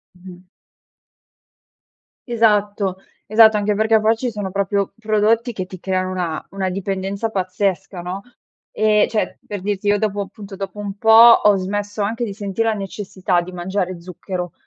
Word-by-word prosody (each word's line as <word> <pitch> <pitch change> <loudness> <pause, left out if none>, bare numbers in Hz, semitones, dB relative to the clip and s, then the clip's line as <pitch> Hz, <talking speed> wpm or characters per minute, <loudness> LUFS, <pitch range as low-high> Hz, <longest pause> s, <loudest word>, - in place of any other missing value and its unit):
Mh-mh. 180 0 -13 1.8
Esatto. 205 -4 +1 0.3
Esatto. 220 +1 +6
Anche 210 0 +1
perché, 220 +1 +3
poi, 220 +1 +3
ci 245 +1 -2
sono 205 -3 -5
proprio 200 0 -1
prodotti 220 +2 +1
che 185 -3 -4
ti 185 -1 -10
creano 185 0 -1
una 175 -4 -3
una 195 -1 -2
dipendenza 195 +3 -3
pazzesca, 190 -1 -2
no, 180 +3 -5 0.5
ehm, 215 0 +3
cioè 220 - -2
per 205 -3 -5
dirti 205 0 -3
io 205 0 +4
dopo 205 -1 -1
appunto, 195 0 -11
dopo 195 +1 -6
un 200 -1 -5
po', 225 - 0 0.3
ho 210 -1 +6
smesso 205 +2 -3
anche 230 +4 -1
di 205 - -5
senti' 200 +1 -2
la 225 -1 +1
necessità 195 -2 -2
di 180 +1 -6
mangiare 185 0 -3
zucchero. 180 0 -6
200 Hz, 155 wpm, -20 LUFS, 185-210 Hz, 1.8 s, Esatto